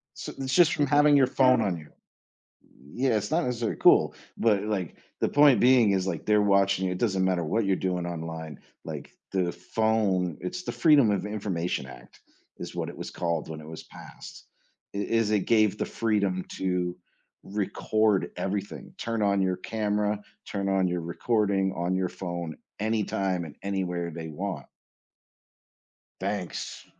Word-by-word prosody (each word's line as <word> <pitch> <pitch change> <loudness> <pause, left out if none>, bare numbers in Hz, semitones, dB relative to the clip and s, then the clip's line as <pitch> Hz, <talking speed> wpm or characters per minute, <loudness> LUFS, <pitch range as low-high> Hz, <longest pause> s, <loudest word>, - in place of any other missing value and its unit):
So, - - -6
it's 135 -1 -2
just 175 -4 +5
from 145 - +1
having 145 +1 +5
your 135 -2 +5
phone 130 -1 +4
on 95 -5 0
you 75 - -12 1.0
yeah, 125 - +1
it's 105 +2 -2
not 165 +2 +2
necessarily 120 -2 -2
cool, - - +5 0.2
but 105 -4 +3
like, 100 -5 -3 0.2
the - - +2
point 145 -6 +5
being 125 -4 +6
is, 95 -1 0
like, 85 -5 -3
they're 105 0 +4
watching 100 -1 +3
you, 90 - -1
it 90 - -4
doesn't 95 -4 +1
matter 90 -3 +1
what 110 +8 0
you're 95 -1 +2
doing 90 -2 -2
online, 80 -2 -6 0.3
like, - - -7 0.2
the 90 -2 0
phone 95 -3 0
it's 180 0 -4
the - - -4
Freedom 145 -9 +5
of 100 0 0
Information 95 -9 -2
Act 65 -1 -14 0.4
is - - -7
what - - -3
it - - -8
was - - -6
called 85 -2 -2
when 80 -1 -6
it 75 - -11
was 80 - -8
passed, - - -12 0.5
it 100 0 -3
is 115 -2 +2
it 105 -1 +3
gave 110 0 +3
the - - -1
freedom 100 -5 0
to 90 -1 -1 0.5
record 105 +1 0
everything, 100 +1 -4
turn 115 -1 -2
on 100 -1 +2
your 95 -1 +1
camera, 105 0 -1 0.3
turn 100 -1 -2
on 95 -1 +2
your 90 -1 -2
recording 100 +2 0
on 90 +2 -1
your 95 -1 0
phone 85 -3 -5 0.2
anytime, 100 -4 0
and 80 - -10
anywhere 90 -3 -2
they 80 0 -7
want. 80 -3 -5 1.5
Thanks, 95 -1 -4
100 Hz, 165 wpm, -27 LUFS, 90-110 Hz, 1.5 s, being